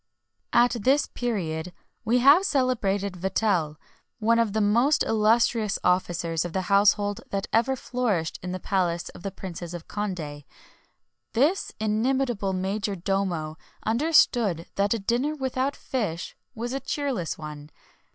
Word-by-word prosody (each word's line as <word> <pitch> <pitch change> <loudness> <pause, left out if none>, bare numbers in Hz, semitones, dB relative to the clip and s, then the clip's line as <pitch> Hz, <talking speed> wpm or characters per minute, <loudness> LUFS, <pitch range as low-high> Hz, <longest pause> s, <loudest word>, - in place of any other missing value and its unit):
At 240 +1 +5
this 270 +7 +3
period 180 -8 -3 0.3
we 235 +2 +2
have 280 +6 +8
the - - -4
celebrated 210 - 0
Vatel, 180 -4 0 0.4
one 230 +1 +3
of 225 -3 +1
the 220 - +1
most 235 +8 +3
illustrious 220 0 +2
officers 175 -3 +1
of 175 -2 -6
the 190 - -1
household 205 0 +3
that 195 0 -2
ever 240 +4 +3
flourished 230 -11 -2
in 180 - -5
the 185 - -4
palace 175 -3 -1
of - - -12
the 195 - -3
Princes 175 -2 -7
of 170 - -9
Condé. 165 -9 -4 0.9
This 300 +11 +2
inimitable 220 -1 0
major 200 +3 -2
domo 175 -4 -2 0.3
understood 230 - +3
that 200 +3 +1
a - - -1
dinner 240 +8 0
without 265 0 -1
fish 200 -10 -3 0.2
was 240 +2 -4
a 270 - -1
cheerless 270 - -2
one. 150 -1 -8
205 Hz, 140 wpm, -26 LUFS, 180-240 Hz, 0.9 s, have